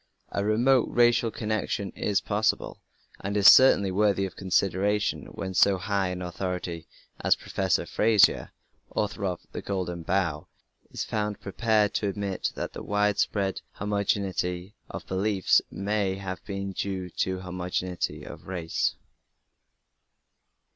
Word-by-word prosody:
A 100 Hz, -, -1 dB
remote 120 Hz, +4 st, +3 dB
racial 120 Hz, -1 st, +3 dB
connection 110 Hz, -2 st, -2 dB
is 100 Hz, -1 st, 0 dB
possible, 105 Hz, +1 st, -1 dB, 0.4 s
and 100 Hz, +2 st, -2 dB
is 100 Hz, -, +1 dB
certainly 100 Hz, -7 st, +7 dB
worthy 100 Hz, 0 st, +2 dB
of 95 Hz, -, -7 dB
consideration 95 Hz, -4 st, 0 dB
when 95 Hz, -1 st, -6 dB
so 100 Hz, +1 st, +4 dB
high 100 Hz, 0 st, 0 dB
an 90 Hz, 0 st, -4 dB
authority 90 Hz, -2 st, -4 dB, 0.3 s
as -, -, +3 dB
Professor 95 Hz, -5 st, -1 dB
Frazer, 110 Hz, -2 st, +3 dB, 0.4 s
author 105 Hz, -1 st, -1 dB
of 90 Hz, -2 st, -2 dB
The -, -, -5 dB
Golden 90 Hz, -3 st, -3 dB
Bough, 85 Hz, -3 st, -1 dB, 0.4 s
is -, -, -4 dB
found 105 Hz, -1 st, -2 dB
prepared 105 Hz, +1 st, +1 dB
to 105 Hz, -, 0 dB
admit 100 Hz, -1 st, -2 dB
that -, -, -4 dB
the -, -, -7 dB
widespread 105 Hz, -1 st, 0 dB
"homogeneity 100 Hz, -2 st, -1 dB, 0.2 s
of 90 Hz, -4 st, -7 dB
beliefs" 95 Hz, +1 st, +2 dB
may 100 Hz, -1 st, -1 dB
have 95 Hz, -1 st, -6 dB
been 100 Hz, -1 st, -4 dB
due 95 Hz, -2 st, -4 dB
to 95 Hz, 0 st, 0 dB
"homogeneity 90 Hz, 0 st, -3 dB
of -, -, -10 dB
race". 85 Hz, -3 st, -1 dB
100 Hz, 125 wpm, -27 LUFS, 90-105 Hz, 0.4 s, certainly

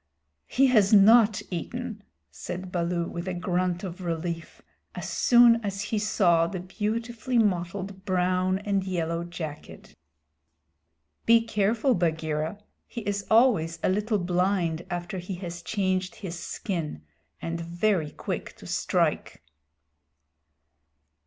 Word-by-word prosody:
"He 270 Hz, -, +3 dB
has 215 Hz, -7 st, +4 dB
not 215 Hz, 0 st, +6 dB
eaten," 220 Hz, +5 st, -5 dB, 0.3 s
said 185 Hz, +1 st, -6 dB
Baloo, 170 Hz, -1 st, -1 dB
with 170 Hz, +1 st, -6 dB
a 185 Hz, -, -2 dB
grunt 180 Hz, 0 st, -1 dB
of 185 Hz, 0 st, -6 dB
relief, 170 Hz, -1 st, -4 dB, 0.3 s
as -, -, -5 dB
soon 235 Hz, -1 st, +5 dB
as 195 Hz, -1 st, -3 dB
he 210 Hz, 0 st, -1 dB
saw 175 Hz, -5 st, +3 dB
the 185 Hz, +1 st, -5 dB
beautifully 230 Hz, +6 st, -2 dB
mottled 190 Hz, -1 st, -1 dB
brown 185 Hz, 0 st, +1 dB
and 200 Hz, -1 st, -1 dB
yellow 170 Hz, -3 st, -2 dB
jacket. 160 Hz, -4 st, -8 dB, 1.3 s
"Be 230 Hz, 0 st, +7 dB
careful, 220 Hz, +4 st, +1 dB
Bagheera! 160 Hz, -1 st, -1 dB, 0.3 s
He 235 Hz, -, -6 dB
is 200 Hz, -1 st, -3 dB
always 215 Hz, -9 st, +4 dB
a -, -, +3 dB
little 210 Hz, +3 st, +1 dB
blind 180 Hz, -2 st, 0 dB
after 175 Hz, +2 st, -4 dB
he 180 Hz, +2 st, -5 dB
has 175 Hz, -1 st, -7 dB
changed 185 Hz, 0 st, -1 dB
his 175 Hz, -5 st, -6 dB
skin, 160 Hz, -, -4 dB, 0.4 s
and 165 Hz, 0 st, -4 dB
very 170 Hz, -1 st, 0 dB
quick -, -, -5 dB
to -, -, -14 dB
strike." -, -, -1 dB
185 Hz, 120 wpm, -27 LUFS, 170-210 Hz, 1.3 s, Be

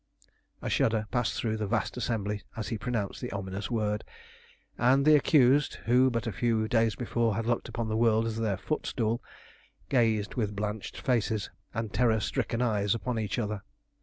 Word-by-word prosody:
A -, -, -2 dB
shudder 110 Hz, -1 st, +2 dB
passed 120 Hz, -2 st, 0 dB
through 110 Hz, -1 st, -1 dB
the 105 Hz, -1 st, -2 dB
vast -, -, -1 dB
assembly 105 Hz, -4 st, -2 dB, 0.2 s
as 110 Hz, -, -3 dB
he 115 Hz, -, -2 dB
pronounced 115 Hz, -5 st, -2 dB
the -, -, -4 dB
ominous 100 Hz, 0 st, -4 dB
word, 105 Hz, -3 st, -1 dB, 0.7 s
and 130 Hz, +4 st, +3 dB
the 155 Hz, 0 st, +7 dB
accused, 145 Hz, -1 st, +4 dB
who 125 Hz, +3 st, +5 dB
but 115 Hz, -1 st, -2 dB
a 115 Hz, -, -1 dB
few 110 Hz, +1 st, +1 dB
days 115 Hz, -1 st, +2 dB
before 115 Hz, -3 st, 0 dB
had 115 Hz, +2 st, -2 dB
looked 120 Hz, 0 st, -1 dB
upon 115 Hz, -2 st, -3 dB
the 110 Hz, -, -1 dB
world 115 Hz, 0 st, +3 dB
as 115 Hz, -1 st, -2 dB
their 110 Hz, -4 st, 0 dB
footstool, 115 Hz, 0 st, -1 dB, 0.7 s
gazed 110 Hz, -4 st, +2 dB
with 105 Hz, -5 st, -2 dB
blanched 105 Hz, 0 st, -4 dB
faces 110 Hz, -5 st, 0 dB, 0.2 s
and 110 Hz, -1 st, -4 dB
terror 110 Hz, +1 st, +3 dB
stricken 115 Hz, +3 st, -1 dB
eyes 105 Hz, -3 st, +1 dB
upon 115 Hz, 0 st, -2 dB
each 105 Hz, 0 st, -2 dB
other. 105 Hz, -3 st, -2 dB
115 Hz, 175 wpm, -29 LUFS, 105-120 Hz, 0.7 s, the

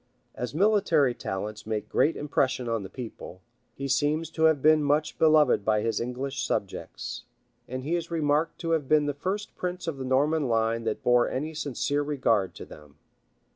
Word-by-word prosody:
As 125 Hz, +3 st, -5 dB
military 180 Hz, -, +3 dB
talents 105 Hz, 0 st, -5 dB
make 110 Hz, -2 st, -2 dB
great 160 Hz, -, +2 dB
impression 130 Hz, -3 st, 0 dB
on 115 Hz, -2 st, -1 dB
the 95 Hz, -, -8 dB
people, 110 Hz, -7 st, -8 dB, 0.4 s
he 140 Hz, -, -4 dB
seems 150 Hz, +4 st, 0 dB
to 160 Hz, -1 st, +1 dB
have 160 Hz, -2 st, +4 dB
been 155 Hz, +2 st, +4 dB
much 150 Hz, +1 st, 0 dB
beloved 155 Hz, -8 st, +4 dB
by 105 Hz, 0 st, +2 dB
his 115 Hz, 0 st, -1 dB
English 130 Hz, +3 st, -3 dB
subjects; 100 Hz, -, -4 dB, 0.4 s
and 130 Hz, +1 st, -5 dB
he 155 Hz, +5 st, -2 dB
is 170 Hz, -1 st, -2 dB
remarked 155 Hz, -1 st, 0 dB
to 165 Hz, -2 st, -2 dB
have 155 Hz, -5 st, 0 dB
been 155 Hz, -1 st, +4 dB
the 145 Hz, -, -1 dB
first 190 Hz, +8 st, -4 dB
prince 180 Hz, 0 st, -4 dB
of 165 Hz, -4 st, -3 dB
the 135 Hz, -, -5 dB
Norman 140 Hz, +3 st, +1 dB
line 115 Hz, 0 st, 0 dB
that 110 Hz, -, -2 dB
bore 120 Hz, 0 st, +4 dB
any 155 Hz, +4 st, -3 dB
sincere 145 Hz, -1 st, -1 dB
regard 125 Hz, -9 st, 0 dB
to -, -, -8 dB
them. 75 Hz, -1 st, -15 dB
140 Hz, 180 wpm, -27 LUFS, 115-155 Hz, 0.4 s, have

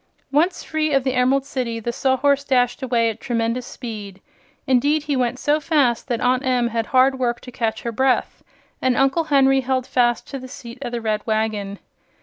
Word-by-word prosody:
Once 325 Hz, +6 st, +1 dB
free 310 Hz, -1 st, -1 dB
of 270 Hz, -1 st, +3 dB
the 260 Hz, -1 st, 0 dB
Emerald 260 Hz, +2 st, +2 dB
City 245 Hz, -4 st, -3 dB
the 235 Hz, +2 st, -3 dB
Sawhorse 275 Hz, +2 st, +2 dB
dashed 250 Hz, -2 st, +1 dB
away 235 Hz, -3 st, +1 dB
at 225 Hz, -, -12 dB
tremendous 235 Hz, 0 st, -2 dB
speed. 210 Hz, -6 st, -8 dB, 0.5 s
Indeed, 285 Hz, +4 st, +2 dB
he 295 Hz, -2 st, -1 dB
went 250 Hz, -1 st, 0 dB
so 295 Hz, +3 st, +1 dB
fast 280 Hz, -7 st, +1 dB
that 240 Hz, -3 st, -1 dB
Aunt 250 Hz, +1 st, +2 dB
Em 250 Hz, -3 st, +1 dB
had 230 Hz, -1 st, -2 dB
hard 260 Hz, +1 st, +3 dB
work 240 Hz, -1 st, 0 dB
to 250 Hz, -, -10 dB
catch 230 Hz, -3 st, -2 dB
her 235 Hz, -, -2 dB
breath, 260 Hz, +3 st, 0 dB, 0.4 s
and 255 Hz, -1 st, +1 dB
Uncle 270 Hz, +5 st, +2 dB
Henry 270 Hz, -2 st, +4 dB
held 260 Hz, 0 st, -1 dB
fast 240 Hz, -2 st, +1 dB
to 275 Hz, -, -5 dB
the 260 Hz, -, -9 dB
seat 235 Hz, -1 st, -10 dB
of 245 Hz, -3 st, -4 dB
the 240 Hz, -1 st, -3 dB
red 215 Hz, -1 st, -1 dB
wagon. 215 Hz, -2 st, -1 dB
255 Hz, 195 wpm, -21 LUFS, 235-270 Hz, 0.5 s, Henry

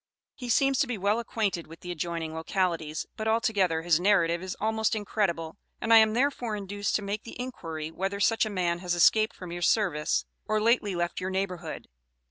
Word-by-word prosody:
He 245 Hz, -3 st, -8 dB
seems 270 Hz, +3 st, +3 dB
to 280 Hz, -, +3 dB
be 245 Hz, -3 st, -3 dB
well 200 Hz, +4 st, +1 dB
acquainted 210 Hz, -7 st, -2 dB
with 165 Hz, +1 st, -13 dB
the 180 Hz, -, -6 dB
adjoining 165 Hz, -1 st, -3 dB
localities, 160 Hz, -2 st, -1 dB
but 220 Hz, -, -3 dB
altogether 200 Hz, -7 st, +1 dB
his 170 Hz, -2 st, +3 dB
narrative 175 Hz, -3 st, +3 dB
is 185 Hz, 0 st, -5 dB
almost 220 Hz, +1 st, +1 dB
incredible, 190 Hz, -5 st, -1 dB, 0.2 s
and 225 Hz, -, +2 dB
I -, -, +10 dB
am 220 Hz, -1 st, +6 dB
therefore 245 Hz, -3 st, 0 dB
induced 205 Hz, 0 st, -2 dB
to 210 Hz, -, 0 dB
make 205 Hz, +2 st, -3 dB
the 230 Hz, -, -11 dB
inquiry 165 Hz, -11 st, -5 dB
whether 195 Hz, +4 st, -3 dB
such 225 Hz, +3 st, +3 dB
a 215 Hz, -, -1 dB
man 175 Hz, -4 st, 0 dB
has 175 Hz, -1 st, -1 dB
escaped 215 Hz, +5 st, +4 dB
from 180 Hz, -2 st, -8 dB
your 175 Hz, 0 st, -5 dB
service 170 Hz, -6 st, +1 dB, 0.2 s
or 215 Hz, 0 st, +1 dB
lately 215 Hz, -3 st, +2 dB
left 175 Hz, +1 st, -2 dB
your 185 Hz, -, -2 dB
neighborhood. 190 Hz, -2 st, -4 dB
195 Hz, 195 wpm, -28 LUFS, 170-220 Hz, 0.2 s, I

